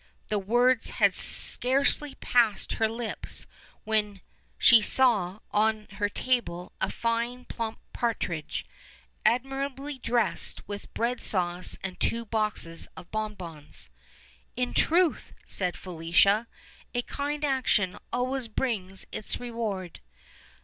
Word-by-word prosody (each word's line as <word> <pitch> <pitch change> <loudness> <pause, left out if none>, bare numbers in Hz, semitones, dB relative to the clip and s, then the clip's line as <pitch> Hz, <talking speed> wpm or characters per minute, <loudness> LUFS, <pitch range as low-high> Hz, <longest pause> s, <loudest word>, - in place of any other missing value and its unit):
The 210 - +1
words 240 +4 +3
had - - +5
scarcely 275 +2 +4
passed 230 -4 +2
her 220 -1 +1
lips 230 0 -3 0.4
when 210 -2 0 0.4
c*ie 235 -3 +8
saw 210 -5 +2
on 215 0 +1
her 205 +1 -1
table 205 -7 -1
a - - +1
fine 235 +2 -2
plump 225 -2 -4 0.2
partridge, 170 -10 -2 0.6
admi 270 +3 +1
rably 275 0 -8
dressed 230 -9 0
with 205 0 -7
bread 240 +2 -1
sauce, 180 -2 +1
and 190 -1 -5
two 230 0 0
boxes 210 -7 -2
of 175 - -11
bonbons. 185 -9 -6 0.6
"In 250 0 -1
truth," 340 0 +2
said 180 -2 -2
Felicia, 185 +5 +2 0.5
"a 245 - +1
kind 290 +3 -2
action 250 -9 +1 0.2
always 250 +1 -1
brings 205 -5 -3
its 215 - -2
reward." 220 -7 -4
220 Hz, 115 wpm, -28 LUFS, 195-250 Hz, 0.6 s, c*ie